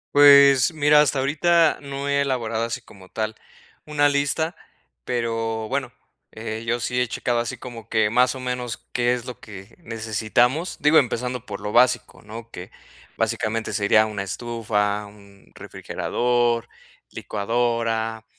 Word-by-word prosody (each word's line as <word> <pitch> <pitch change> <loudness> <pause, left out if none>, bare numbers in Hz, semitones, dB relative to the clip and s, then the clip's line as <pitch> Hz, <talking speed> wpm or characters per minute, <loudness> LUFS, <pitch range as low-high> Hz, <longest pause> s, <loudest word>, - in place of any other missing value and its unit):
Pues, 140 0 +7
mira, 150 -1 +5
hasta 145 -2 +1
ahorita 160 +4 +2
no 140 0 -5
he 140 0 +2
elaborado 115 -4 -1
así 115 +2 -3
como 95 -5 -17
tal 110 0 -3 0.5
una 145 -1 +2
lista, 145 +4 0 0.5
pero, 115 -2 -2
bueno, 130 -1 -3 0.4
eh, 110 0 -6
yo 120 0 0
sí 125 +2 -3
he - - +2
checado 120 -1 -1
así 120 -1 -3
como 115 -3 -10
que, 110 -1 +2
más 125 +3 +3
o 130 - -8
menos, 125 -2 -4 0.2
qué 120 0 +1
es 125 -1 -4
lo 125 - -9
que 100 +1 -12
necesitamos. 120 - -1
Digo, 150 +2 +5
empezando 125 -1 -2
por 100 -1 -7
lo 105 - -5
básico, 125 +1 +2
¿no? 115 +2 -10
Que, 90 -2 -10 0.5
básicamente, 110 -1 -1
sería 110 +1 +3
una 105 -2 -4
estufa, 105 -1 -2
un 100 -1 -18
refrigerador, 120 -1 -1 0.4
licuadora, 115 0 -2
120 Hz, 145 wpm, -23 LUFS, 110-130 Hz, 0.5 s, Pues